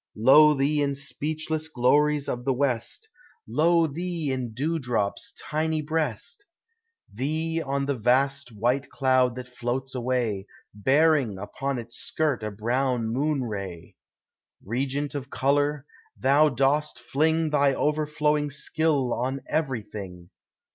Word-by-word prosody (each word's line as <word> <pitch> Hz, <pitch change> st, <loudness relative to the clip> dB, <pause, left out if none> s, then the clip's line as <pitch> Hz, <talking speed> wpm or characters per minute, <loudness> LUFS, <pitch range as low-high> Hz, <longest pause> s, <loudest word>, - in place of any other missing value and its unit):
Lo 150 Hz, +7 st, +7 dB
thee 145 Hz, +2 st, +1 dB
in 140 Hz, -1 st, 0 dB
speechless 155 Hz, +3 st, -3 dB
glories 150 Hz, +1 st, +2 dB
of 125 Hz, 0 st, -3 dB
the 135 Hz, +1 st, +1 dB
west! 130 Hz, -, -1 dB, 0.4 s
Lo 165 Hz, +1 st, +3 dB
thee 165 Hz, -1 st, -3 dB
in 130 Hz, -3 st, -3 dB
dewdrop's 125 Hz, -6 st, -2 dB
tiny 155 Hz, +1 st, -1 dB
breast! 155 Hz, -, -3 dB, 0.7 s
Thee 160 Hz, +7 st, -1 dB
on 140 Hz, -2 st, -1 dB
the 140 Hz, -, 0 dB
vast 135 Hz, +3 st, +1 dB
white 120 Hz, +6 st, 0 dB
cloud 130 Hz, -2 st, +2 dB
that 125 Hz, 0 st, -7 dB
floats 125 Hz, +1 st, -4 dB
awav, 120 Hz, -5 st, -1 dB, 0.3 s
Bearing 135 Hz, 0 st, +3 dB
upon 135 Hz, +7 st, -3 dB
its 120 Hz, 0 st, -7 dB
skirt 150 Hz, -6 st, -1 dB
a 105 Hz, -, -3 dB
brown 120 Hz, +3 st, -1 dB
moon 140 Hz, +3 st, 0 dB
ray! 100 Hz, -7 st, -6 dB, 0.7 s
Regent 135 Hz, +6 st, -2 dB
of 140 Hz, -2 st, -5 dB
color, 145 Hz, +1 st, +1 dB, 0.3 s
thou 145 Hz, +4 st, +4 dB
dost 140 Hz, +3 st, +1 dB
fling 160 Hz, +2 st, +1 dB
Thy 140 Hz, -2 st, +3 dB
overflowing 150 Hz, 0 st, +1 dB
skill 145 Hz, -2 st, 0 dB
on 130 Hz, +3 st, -2 dB
everything! 105 Hz, -, -4 dB
140 Hz, 120 wpm, -26 LUFS, 125-150 Hz, 0.7 s, Lo